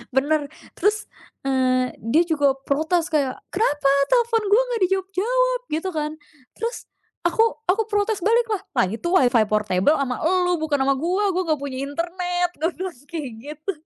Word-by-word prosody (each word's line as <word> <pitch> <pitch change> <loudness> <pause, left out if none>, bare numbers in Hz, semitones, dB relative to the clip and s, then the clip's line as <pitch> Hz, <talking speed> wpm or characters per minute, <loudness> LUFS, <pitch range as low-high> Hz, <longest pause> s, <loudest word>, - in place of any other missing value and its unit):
Bener, 290 +2 +2 0.3
terus, 425 +3 0 0.4
eee, 255 -1 +1
dia 265 +10 +3
juga 290 -5 +2
protes, 320 +4 +1
kayak, 280 -5 +1 0.2
"Kenapa 290 -10 +1 0.2
telfon 470 -2 +3
gue 425 +5 +6
nggak 475 -3 -2
dijawab-jawab?" 440 +7 0
Gitu 325 +5 -1
kan. 305 -2 -2 0.4
Terus 465 +2 -4 0.4
aku 350 +6 +3 0.2
aku 415 +4 +2
protes 415 -1 0
baliklah, 445 0 +2 0.2
"Lah, 240 - +5
itu 225 - -4
WiFi 250 -10 +4
portable 210 +5 +2
sama 260 -3 -2
elu, 360 +2 +2
bukan 310 -2 +1
sama 275 +1 +3
gue, 355 +9 0
gue 370 +1 0
nggak 310 -2 +1
punya 275 -2 -5
internet", 355 +4 -2
gue 330 - +2
bilang 370 0 -4
kayak 305 -6 -5
gitu. 300 +7 -5
335 Hz, 155 wpm, -23 LUFS, 280-395 Hz, 0.4 s, gue